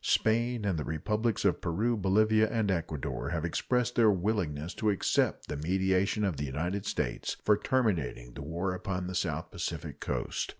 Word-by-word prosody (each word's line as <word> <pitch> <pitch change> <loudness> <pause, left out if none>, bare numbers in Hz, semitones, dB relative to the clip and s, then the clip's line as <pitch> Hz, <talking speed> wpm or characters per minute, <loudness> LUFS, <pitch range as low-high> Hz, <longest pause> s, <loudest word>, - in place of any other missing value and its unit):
Spain 115 0 +2
and 95 -6 0
the - - -2
Republics 105 +9 -1
of 95 - +2
Peru, 105 +8 +1
Bolivia, 110 +2 +3
and 110 -4 +1
Ecuador 80 -5 -2
have 85 -1 -1
expressed 125 +8 0
their 115 -3 +5
willingness 90 -6 0
to 110 - 0
accept 100 - +1
the 75 - -3
mediation 95 +5 +1
of 95 -7 0
the 70 - -2
United 90 +9 -2
States - - -2
for 105 - +5
terminating 100 - 0
the 70 - -8
war 85 +6 -2
upon 90 0 -3
the 90 - -4
South 80 -3 -2
Pacific 80 -3 -4
coast. - - -2
95 Hz, 170 wpm, -30 LUFS, 80-110 Hz, -, their